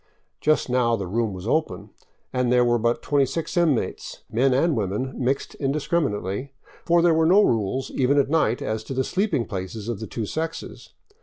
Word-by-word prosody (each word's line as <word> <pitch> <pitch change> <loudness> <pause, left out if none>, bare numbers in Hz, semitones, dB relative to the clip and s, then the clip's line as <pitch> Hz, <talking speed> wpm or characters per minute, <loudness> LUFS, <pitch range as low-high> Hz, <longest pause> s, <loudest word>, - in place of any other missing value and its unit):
Just 155 0 +2
now 125 -2 +2
the 100 -3 -4
room 110 +4 -1
was 95 +2 -7
open, 105 - -1 0.4
and 125 -1 +1
there 125 0 +4
were 120 0 +2
but 115 +2 0
26 145 +3 0
inmates, 165 -8 0
men 130 +4 +2
and 150 +5 +2
women 110 +5 -2
mixed 130 +2 -1
indiscriminately, 135 - -2 0.3
for 170 0 +3
there 175 -1 +5
were 160 0 +3
no 195 +5 +6
rules, 120 - 0
even 135 +2 +2
at 140 - +3
night, 140 -6 +1
as 110 0 -3
to 135 - -5
the 130 - +1
sleeping 185 - 0
places 100 +3 -6
of 120 -4 -3
the 110 - -6
two 115 - -4
sexes. 160 +8 -6
125 Hz, 180 wpm, -24 LUFS, 110-150 Hz, 0.4 s, no